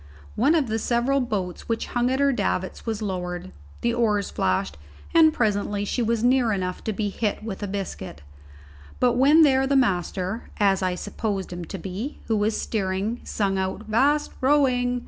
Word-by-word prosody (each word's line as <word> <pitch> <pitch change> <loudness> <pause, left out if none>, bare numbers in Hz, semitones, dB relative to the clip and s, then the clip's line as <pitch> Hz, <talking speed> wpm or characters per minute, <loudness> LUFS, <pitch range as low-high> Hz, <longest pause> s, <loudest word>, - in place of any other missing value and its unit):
One 280 +9 +3
of 310 -4 +2
the 220 -1 -2
several 245 +5 +1
boats 205 -8 -3
which 230 - -1
hung 245 0 +2
at 260 +1 0
her 280 0 +4
davits 185 -3 -2
was 220 -1 -2
lowered, 180 -2 -4 0.3
the 235 - +1
oars 210 -4 +1
flashed, 95 -7 0 0.4
and 320 -1 +7
presently 205 -5 0
she 245 - -1
was 230 0 0
near 245 -2 +3
enough 185 -3 -3
to 220 - 0
be 205 0 -2
hit 210 +1 -2
with 215 -3 -6
a 205 - -2
biscuit; 190 - -6 0.8
but 250 -1 +3
when 285 +6 +6
there 270 -2 +4
the 280 - +1
master, 190 -3 0
as 195 -2 +3
I 185 -1 0
supposed 200 -1 -3
him 175 -1 -6
to 195 - -6
be, 195 - -5
who 225 - 0
was 210 +1 0
steering, 200 +2 -2
sung 195 -2 -1
out, 190 +3 -3
"'Vast 285 +7 +2
rowing!" 255 -3 +2
220 Hz, 180 wpm, -24 LUFS, 190-250 Hz, 0.8 s, and